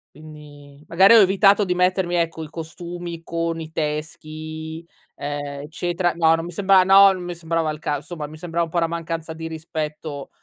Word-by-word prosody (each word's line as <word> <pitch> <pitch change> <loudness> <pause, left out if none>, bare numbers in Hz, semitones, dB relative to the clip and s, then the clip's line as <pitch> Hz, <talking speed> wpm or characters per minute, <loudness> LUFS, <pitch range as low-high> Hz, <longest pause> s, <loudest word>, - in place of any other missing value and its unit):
Quindi, 150 -1 -14
magari 190 +6 +6
ho 230 - +9
evitato 195 +2 +4
di 180 -2 -1
mettermi, 180 0 +1
ecco, 165 -1 -1
i - - -10
costumi 170 +1 -7
con 165 0 -2
i 160 0 -8
teschi, 155 +1 -5 0.3
ehm, 145 0 -5
eccetera 175 +3 -1
no, 165 -1 +4
non 165 0 -2
mi 175 - -6
sembrava 190 +1 +4
no, 195 +1 +7
non 185 -1 -6
mi 175 0 -5
sembrava 165 -1 -1
il 150 - -6
cas 145 -2 -2
insomma 160 -2 -6
mi 155 +1 -11
sembrava 170 +1 -2
un - - -13
po' 175 - -6
una 165 -1 +2
mancanza 165 -1 -4
di 160 0 -6
rispetto 155 -2 -5
165 Hz, 190 wpm, -22 LUFS, 155-175 Hz, 0.3 s, ho